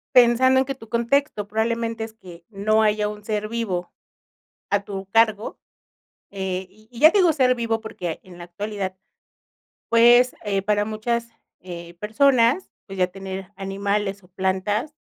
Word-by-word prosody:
Pensando 250 +2 +6
en 260 - +2
que 275 - -3
tu 225 -4 -14
contexto 235 -1 0
probablemente 225 +1 -1
es 220 0 -6
que 175 -5 -14
no 215 +1 +1
haya 210 0 +2
un 210 0 -8
ser 215 0 -2
vivo 200 -7 -3 0.8
a 205 0 +2
tu 195 -1 -6
cargo. 225 -2 +2 0.7
Eh, 190 -1 -3
y 215 +2 -23
y 235 - -11
ya 315 - +9
te 410 - +2
digo 350 -4 +5
ser 255 -3 +3
vivo 230 -2 -1
porque 175 -6 -5
en 180 -2 -14
la 175 - -8
actualidad, 195 +1 -5 0.9
pues, 240 +2 +6
eh, 200 -2 0
para 205 0 +1
muchas, 235 +2 -2 0.3
eh, 170 -1 -9
personas, 240 - +2 0.2
pues, 195 -1 -9
ya 180 - +3
tener 190 0 -7
animales 200 +1 -2
o 180 - -20
plantas 190 - -1
210 Hz, 160 wpm, -23 LUFS, 195-235 Hz, 0.9 s, ya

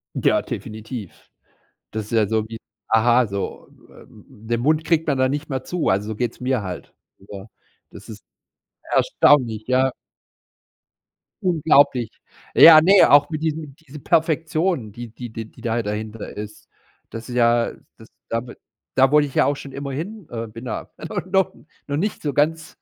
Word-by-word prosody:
Ja, - - +2
definitiv. 110 -1 -8 0.6
Das 110 -1 -4
ist - - -14
ja 110 -2 +3
so 110 -1 -1
wie 115 - -8 0.3
aha, 120 +2 +4
so, 100 -1 -5 0.2
ähm, - - -17
den 115 +2 -4
Mund 155 +4 +1
kriegt 160 0 +1
man 140 -3 0
da 130 0 +3
nicht 145 +2 -3
mehr 130 -2 -2
zu, 180 -2 -2
also, 100 +2 0
so 110 - -3
geht's 120 0 -3
mir 125 -3 0
halt, 90 -2 -7 0.3
oder 100 +1 -11 0.4
das - - -13
ist - - -11 0.7
erstaunlich, 115 -7 +3
ja. 130 0 +2 1.5
Unglaublich. 145 -8 +3 0.4
Ja, 155 -2 +9
ne, 190 +3 +6
auch 145 +1 +6
mit 155 -1 -4
diesen 155 -3 -3
diese 150 -2 -13
Perfektion, 160 - 0
die 120 +2 -9
die 120 -1 -8
die 110 0 -6
die - - -18
da 115 0 -1
dahinter 105 +1 -6
ist. 105 0 -9 0.4
Das 115 +1 -8
ist 125 - -5
ja 120 -1 +2 0.2
das 110 - -16 0.2
damit 120 +1 -4 0.4
da 135 +1 +4
wollte 150 -1 +4
ich - - -16
ja - - +4
auch 145 - +1
schon 140 -1 -10
immer 140 0 -6
hin, 190 +5 -6
ähm, 115 -2 -6
bin 115 +3 -10
da - - -5 0.4
noch 190 -1 +2 0.3
noch 145 - -2
nicht 205 +6 -2
so 145 -2 -2
ganz, 160 +2 -1
130 Hz, 170 wpm, -22 LUFS, 110-150 Hz, 1.5 s, Ja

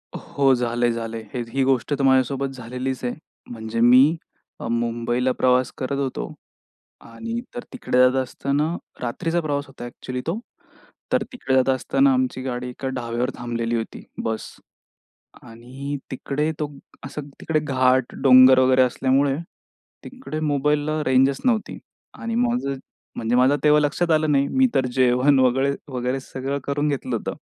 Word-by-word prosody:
हो. 135 -1 +1
झालंय-झालंय. 115 -2 -1
हे 125 - -3
ही 135 +3 0
गोष्ट 130 +1 +1
तर 140 - -1
माझ्यासोबत 135 +1 +2
झालेलीच 125 +2 -5
आहे. 125 - -1 0.4
म्हणजे 110 -1 -5
मी 130 +7 +6 0.5
मुंबईला 120 +2 0
प्रवास 125 0 +2
करत 135 +1 -2
होतो 135 -2 -3 0.7
आणि 230 - -6 0.2
तर 245 - -5
तिकडे 250 - -2
जात 130 +1 +5
असताना 145 +5 -1 0.3
रात्रीचा 165 +8 -1
प्रवास 145 -2 -2
होता 135 -2 -10
एक्चुअली 125 +1 -6
तो. 175 +7 -1 0.7
तर - - +2
तिकडे 135 - -1
जात 130 0 +3
असताना 270 - +2
आमची 255 - 0
गाडी 125 -1 -4
एका 130 +2 -6
ढाब्यावर 120 0 -2
थांबलेली 120 -1 -2
होती. 115 -1 -5 0.2
बस 110 -1 -4 0.9
आणि 130 +5 -7
तिकडे 145 +4 -2
तो 150 - -1 0.4
असं 145 +1 -7
तिकडे 155 -1 0
घाट, 130 -3 +1
डोंगर 130 -1 +8
वगैरे 130 0 +5
असल्यामुळे 135 +2 +2 0.7
तिकडे 255 -12 -7
मोबाईलला 150 +1 0
रेंजच 135 +1 +3
नव्हती 230 -4 0 0.4
आणि 230 0 -5
माझं 240 - 0 0.4
म्हणजे 115 +1 0
माझं 130 +3 +4
तेव्हा 150 0 +6
लक्षात 150 +4 0
आलं 155 -1 +3
नाही. 140 0 +2
मी 265 0 +3
तर 130 -1 +2
जेवण 130 +2 +3
वगैरे-वगैरे 130 0 0
सगळं 135 +1 -4
करून 145 +1 0
घेतलं 130 -4 -2
होतं. - - -4
130 Hz, 140 wpm, -23 LUFS, 125-145 Hz, 0.9 s, डोंगर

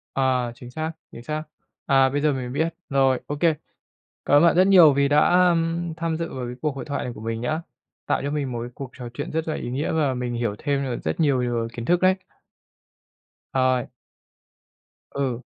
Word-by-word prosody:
À, 130 -3 +1
chính 120 0 -11
xác, 160 +3 -3 0.2
chính 115 - -10
xác. 155 +3 -3 0.4
À, 135 -2 +5
bây 145 +2 -1
giờ 150 -1 +2
mình 125 -2 -4
biết. 160 +4 -1 0.2
Rồi, 135 -2 +3
ô 145 - -3
kê. 165 +1 +3 0.7
Cảm 145 - +5
ơn 150 - +5
bạn 170 - +5
rất 185 +2 +5
nhiều 175 -7 +8
vì 140 0 +2
đã, 150 +1 +4 0.2
ưm, 165 0 0
tham 165 -1 -1
dự 165 0 -4
vào 130 -2 -4
cái 120 - -6
cuộc 150 -3 -1
hội 135 - -6
thoại 140 - -3
này 125 - -5
của 110 - -11
mình 115 0 -3
nhá. 155 +7 -1 0.4
Tạo - - 0
cho 140 - -2
mình 145 -3 -2
một 120 -1 -3
cái 120 - -5
cuộc 135 -2 -7
trò 120 -2 -7
chuyện 145 +7 -5
rất 160 +1 -2
là 155 - -1
ý - - -5
nghĩa, 135 +5 -2
và 150 -4 +1
mình 125 -1 -3
hiểu 115 -3 -1
thêm 140 -2 0
nh - - -9
rất - - -2
nhiều 140 -5 +3
điều 120 -2 -1
kiến 115 -1 -6
thức 175 +3 +2
đấy. 185 0 +5 1.4
Ời. 130 -2 +2 1.3
Ừ. 130 -4 -2
140 Hz, 220 wpm, -24 LUFS, 125-160 Hz, 1.4 s, nhiều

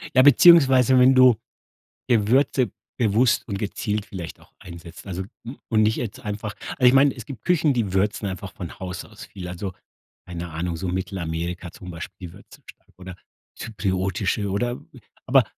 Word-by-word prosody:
Ja, 130 - +7
beziehungsweise 135 -4 +6
wenn 130 +1 +6
du 130 -2 +7 0.7
Gewürze 125 +1 +2 0.3
bewusst 115 +1 +2
und 100 -3 -4
gezielt 105 0 -3
vielleicht 90 -4 -8
auch - - -22
einsetzt, 85 0 -12
also, 95 -1 -4 0.2
hm, 120 +4 -8
und 110 -2 +3
nicht 110 +1 +2
jetzt 110 -4 -5
einfach 105 0 -5 0.2
also 125 - 0
ich - - +5
meine, 135 +1 +5
es - - -9
gibt 140 -5 -10
Küchen, 160 -4 +2
die 110 -6 -1
würzen 100 +2 0
einfach 95 +1 -7
von 90 -3 -8
Haus 90 -1 -6
aus - - -12
viel. 90 -2 -9
Also, 90 +2 -5 0.5
keine 85 -1 -6
Ahnung, 85 +1 -3
so 90 +3 -4
Mittelamerika 85 -1 -4
zum 90 - -10
Beispiel 85 +1 -9
würzen 100 +3 -17
stark - - -16
oder 95 -1 -9 0.4
zypriotische 95 0 -2
oder 120 +5 -2 0.5
aber, - - +5
100 Hz, 165 wpm, -23 LUFS, 90-120 Hz, 0.7 s, Ja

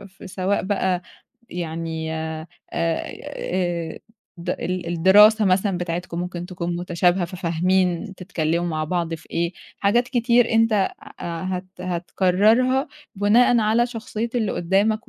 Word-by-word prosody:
في 195 -1 -13
سواء 190 +1 -1
بقى 190 -2 0 0.5
يعني 160 -2 -4
آآ- 160 0 -4 0.3
آآ 170 0 -2 0.4
ده 175 +1 -3
ال 180 -1 -3
الدراسة 205 +6 +6
مثلًا 190 0 +2
بتاعتكم 175 0 -3
ممكن 175 -1 -5
تكون 175 -1 -4
متشابهة 175 +1 +1
ففاهمين 180 +2 0
تتكلِّموا 175 -2 -1
مع 155 -1 -1
بعض 170 0 -1
في 160 - -11
إيه، 170 +1 -1 0.3
حاجات 235 +5 +2
كتير 240 -1 +3
أنت 225 0 +4
آآ 200 -2 +3 0.3
هت 180 +2 -4
هتقرّرها 200 - +2 0.3
بناءً 220 +4 +4
على 225 +3 +3
شخصية 230 -1 -4
اللي 220 -5 0
قُدّامك 200 +5 +1
185 Hz, 125 wpm, -23 LUFS, 170-210 Hz, 0.5 s, الدراسة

